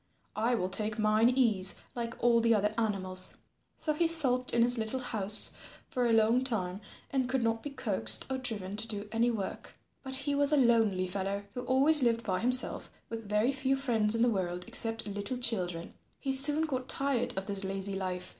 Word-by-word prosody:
I 230 Hz, +3 st, 0 dB
will 185 Hz, -5 st, -2 dB
take 215 Hz, +3 st, -4 dB
mine 215 Hz, +2 st, +3 dB
ease 220 Hz, -7 st, +1 dB, 0.2 s
like 235 Hz, -1 st, -4 dB
all 235 Hz, -1 st, +4 dB
the 230 Hz, 0 st, +3 dB
other 210 Hz, +1 st, 0 dB
animals." 185 Hz, -4 st, -2 dB, 0.4 s
So 305 Hz, -, -2 dB
he 330 Hz, +3 st, +1 dB
sulked 260 Hz, -6 st, +1 dB
in 235 Hz, -, +2 dB
his 245 Hz, 0 st, +2 dB
little 220 Hz, +4 st, -1 dB
house 215 Hz, -4 st, +6 dB, 0.4 s
for 250 Hz, -2 st, 0 dB
a -, -, +1 dB
long 225 Hz, +3 st, +3 dB
time 200 Hz, -6 st, -4 dB, 0.3 s
and 260 Hz, -2 st, -1 dB
could 260 Hz, -1 st, -1 dB
not 225 Hz, 0 st, -1 dB
be 290 Hz, -, -6 dB
coaxed 200 Hz, -, +1 dB
or 265 Hz, 0 st, -3 dB
driven 205 Hz, -6 st, -3 dB
to 220 Hz, +1 st, -2 dB
do 205 Hz, -2 st, -5 dB
any 230 Hz, +1 st, +1 dB
work. 210 Hz, -5 st, -6 dB, 0.3 s
But 265 Hz, -1 st, -7 dB
as 265 Hz, -, 0 dB
he 285 Hz, +1 st, -2 dB
was 285 Hz, +1 st, +2 dB
a 300 Hz, -, +3 dB
lonely 225 Hz, -7 st, +2 dB
fellow 195 Hz, +2 st, -4 dB
who 250 Hz, -, -5 dB
always 275 Hz, +4 st, +3 dB
lived 230 Hz, -2 st, +1 dB
by 185 Hz, -4 st, -2 dB
himself 250 Hz, +2 st, -1 dB, 0.2 s
with 225 Hz, -2 st, -7 dB
very 210 Hz, +5 st, +1 dB
few 265 Hz, 0 st, -1 dB
friends 230 Hz, -5 st, +1 dB
in 230 Hz, -, +1 dB
the 245 Hz, -, +3 dB
world 180 Hz, -3 st, -3 dB
except 225 Hz, -1 st, -3 dB
little 205 Hz, +4 st, -5 dB
children, 180 Hz, -9 st, -2 dB, 0.3 s
he 270 Hz, -, -3 dB
soon 290 Hz, +4 st, +6 dB
got 260 Hz, -4 st, -4 dB
tired 265 Hz, -6 st, -1 dB
of 190 Hz, -, -3 dB
this 200 Hz, -1 st, -4 dB
lazy 195 Hz, +1 st, -3 dB
life. 185 Hz, -1 st, -5 dB
230 Hz, 200 wpm, -30 LUFS, 200-255 Hz, 0.4 s, house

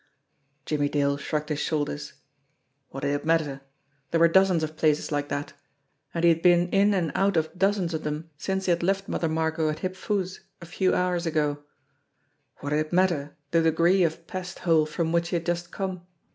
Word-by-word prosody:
Jimmie 145 Hz, -2 st, 0 dB
Dale 140 Hz, -1 st, +1 dB
shrugged 150 Hz, +1 st, -3 dB
his 150 Hz, -1 st, -1 dB
shoulders. 150 Hz, -1 st, -2 dB, 0.8 s
What 135 Hz, -, -7 dB
did 140 Hz, -, 0 dB
it 145 Hz, -, -2 dB
matter? 155 Hz, -4 st, 0 dB, 0.5 s
There 165 Hz, -, +1 dB
were 170 Hz, -, +7 dB
dozens 185 Hz, -1 st, +4 dB
of 155 Hz, 0 st, -4 dB
places 155 Hz, -1 st, +1 dB
like 145 Hz, -1 st, -1 dB
that 145 Hz, 0 st, -4 dB, 0.6 s
and 170 Hz, -, -3 dB
he 170 Hz, -, +7 dB
had 165 Hz, 0 st, 0 dB
been 175 Hz, 0 st, +4 dB
in 200 Hz, +2 st, +3 dB
and 170 Hz, -4 st, 0 dB
out 195 Hz, -2 st, +2 dB
of 160 Hz, +2 st, -1 dB
dozens 195 Hz, -2 st, +1 dB
of 160 Hz, -, -3 dB
them 150 Hz, +2 st, -4 dB
since 190 Hz, +5 st, -2 dB
he 180 Hz, -, +2 dB
had 170 Hz, -, +1 dB
left 195 Hz, +2 st, 0 dB
Mother 165 Hz, -, -1 dB
Margot 160 Hz, 0 st, 0 dB
at 155 Hz, -, -2 dB
Hip 185 Hz, 0 st, -3 dB
Foo's 190 Hz, -2 st, -2 dB, 0.2 s
a 170 Hz, -, -10 dB
few 185 Hz, +2 st, +1 dB
hours 180 Hz, -1 st, 0 dB
ago. 150 Hz, -2 st, -1 dB, 1.0 s
What 145 Hz, -, -4 dB
did 150 Hz, -, +2 dB
it 155 Hz, 0 st, -3 dB
matter 170 Hz, -6 st, +1 dB
the 165 Hz, -, +4 dB
degree 170 Hz, +4 st, +3 dB
of 165 Hz, 0 st, -1 dB
pest 180 Hz, 0 st, -6 dB
hole 160 Hz, -3 st, +4 dB
from 165 Hz, +1 st, -2 dB
which 170 Hz, 0 st, +1 dB
he 180 Hz, -, -1 dB
had 170 Hz, -1 st, -2 dB
just 175 Hz, 0 st, -2 dB
come? 185 Hz, -2 st, -5 dB
165 Hz, 200 wpm, -26 LUFS, 150-180 Hz, 1.0 s, were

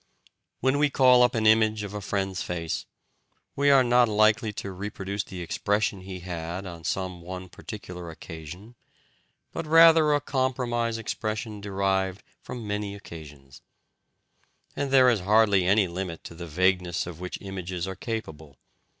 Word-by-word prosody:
When 130 Hz, +3 st, +2 dB
we 150 Hz, 0 st, +4 dB
call 130 Hz, -2 st, +5 dB
up 125 Hz, -1 st, +4 dB
an 110 Hz, -1 st, 0 dB
image 110 Hz, -1 st, +4 dB
of 100 Hz, 0 st, -6 dB
a 105 Hz, -, -4 dB
friend's 95 Hz, -1 st, -2 dB
face, 85 Hz, -2 st, -3 dB, 0.7 s
we 140 Hz, +1 st, +3 dB
are 135 Hz, -2 st, +7 dB
not 120 Hz, -1 st, +4 dB
likely 110 Hz, +1 st, +3 dB
to 100 Hz, -, -5 dB
reproduce 100 Hz, +1 st, -4 dB
the 95 Hz, -2 st, -8 dB
expression 105 Hz, +3 st, -1 dB
he 95 Hz, -1 st, -8 dB
had 85 Hz, +1 st, -5 dB
on 85 Hz, -3 st, -8 dB
some 95 Hz, 0 st, -3 dB
one 90 Hz, +1 st, -7 dB
particular 90 Hz, -4 st, -8 dB
occasion, 80 Hz, +6 st, -10 dB, 0.8 s
but 165 Hz, -, -5 dB
rather 160 Hz, -1 st, +7 dB
a -, -, +2 dB
compromise 120 Hz, -4 st, -1 dB
expression 110 Hz, -1 st, -4 dB
derived 95 Hz, -1 st, -1 dB, 0.2 s
from 120 Hz, -3 st, -7 dB
many 105 Hz, -1 st, -3 dB
occasions. 75 Hz, -8 st, -12 dB, 1.1 s
And 140 Hz, -1 st, -2 dB
there 130 Hz, -1 st, +6 dB
is 120 Hz, -4 st, +4 dB
hardly 100 Hz, -1 st, +3 dB
any 100 Hz, 0 st, +4 dB
limit 85 Hz, -1 st, -5 dB
to -, -, -9 dB
the 85 Hz, +1 st, -8 dB
vagueness 90 Hz, +1 st, +1 dB
of 85 Hz, -2 st, -8 dB
which 90 Hz, 0 st, -5 dB
images 95 Hz, -2 st, -5 dB
are 95 Hz, -, -5 dB
capable. 80 Hz, -, -6 dB
100 Hz, 150 wpm, -26 LUFS, 90-115 Hz, 1.1 s, are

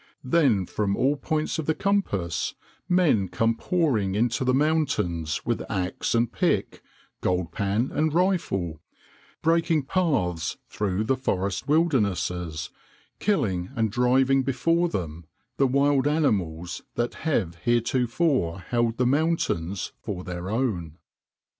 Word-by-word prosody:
Then 130 Hz, -, +3 dB
from 100 Hz, +2 st, -1 dB
all 135 Hz, +3 st, +2 dB
points 155 Hz, +2 st, -2 dB
of 155 Hz, -, -4 dB
the 160 Hz, -, +2 dB
compass 100 Hz, -, -1 dB, 0.3 s
men 165 Hz, -, +3 dB
come 115 Hz, +6 st, +1 dB
pouring 115 Hz, -, 0 dB
into 115 Hz, +3 st, +1 dB
the 130 Hz, -, +2 dB
mountains 125 Hz, -, 0 dB
with 120 Hz, -1 st, 0 dB
axe 95 Hz, +1 st, -1 dB
and 115 Hz, 0 st, +2 dB
pick, -, -, 0 dB, 0.4 s
gold 90 Hz, -2 st, 0 dB
pan 100 Hz, +7 st, 0 dB
and 155 Hz, +1 st, +1 dB
rifle, 145 Hz, -, 0 dB, 0.6 s
breaking 165 Hz, -1 st, +2 dB
paths 130 Hz, -, 0 dB
through 100 Hz, 0 st, -1 dB
the 130 Hz, +5 st, +1 dB
forest 100 Hz, -7 st, -2 dB
wildernesses, 95 Hz, -, 0 dB, 0.5 s
killing 95 Hz, -, 0 dB
and 110 Hz, -3 st, +1 dB
driving 130 Hz, +3 st, +3 dB
before 165 Hz, +7 st, +1 dB
them 85 Hz, -, -5 dB, 0.3 s
the 135 Hz, -, +4 dB
wild 140 Hz, +1 st, +3 dB
animals 95 Hz, -, 0 dB
that 120 Hz, 0 st, -1 dB, 0.2 s
have 95 Hz, -, +1 dB
heretofore 120 Hz, -, +1 dB
held 115 Hz, +4 st, -1 dB
the 125 Hz, -, +2 dB
mountains 125 Hz, -, 0 dB
for 95 Hz, -4 st, -5 dB
their 90 Hz, +1 st, -5 dB
own. 100 Hz, -, -2 dB
120 Hz, 120 wpm, -25 LUFS, 90-145 Hz, 0.6 s, the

